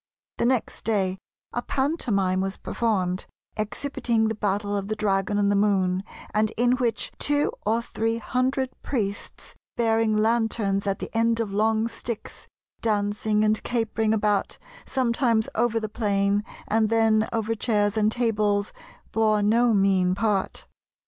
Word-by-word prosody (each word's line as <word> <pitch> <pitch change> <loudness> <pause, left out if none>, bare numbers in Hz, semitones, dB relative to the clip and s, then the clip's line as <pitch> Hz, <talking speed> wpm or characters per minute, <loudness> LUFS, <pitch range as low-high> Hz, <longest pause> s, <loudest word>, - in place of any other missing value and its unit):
The 235 - +3
next 255 -2 -1
day 190 -4 0 0.3
a 240 - -1
pantomime 230 - 0
was 195 +1 -3
performed, 190 -5 -1 0.3
exhibiting 220 0 -1
the - - -1
battle 205 -1 -1
of 200 -1 -2
the 215 - -2
dragon 205 -1 0
and 200 0 +2
the - - +2
Moon, 190 -2 +2 0.3
and 215 0 +2
in 245 +1 +3
which 240 -3 -1
two 290 0 +1 0.2
or 230 +2 +2
three 225 0 -1
hundred 255 +3 -1
priests, 205 -6 -4 0.2
bearing 225 -2 +2
lanterns 215 -3 +1
at 195 0 0
the - - -7
end 230 0 +2
of 215 -4 -2
long 220 +2 +2
sticks, 230 -1 -7 0.3
dancing 210 0 +1
and 215 0 +2
capering 225 -2 0
about, 210 -2 +1 0.3
sometimes 235 -3 +1
over 230 0 +1
the 220 - -3
plain, 205 -2 0 0.2
and 220 0 +2
then 220 -1 +3
over 225 -1 -1
chairs 210 -2 +1
and 215 0 +2
tables, 210 -4 0 0.4
bore 215 -2 +2
no 230 +3 +4
mean 190 -3 +3
part. 200 -2 -1
215 Hz, 140 wpm, -25 LUFS, 205-230 Hz, 0.4 s, no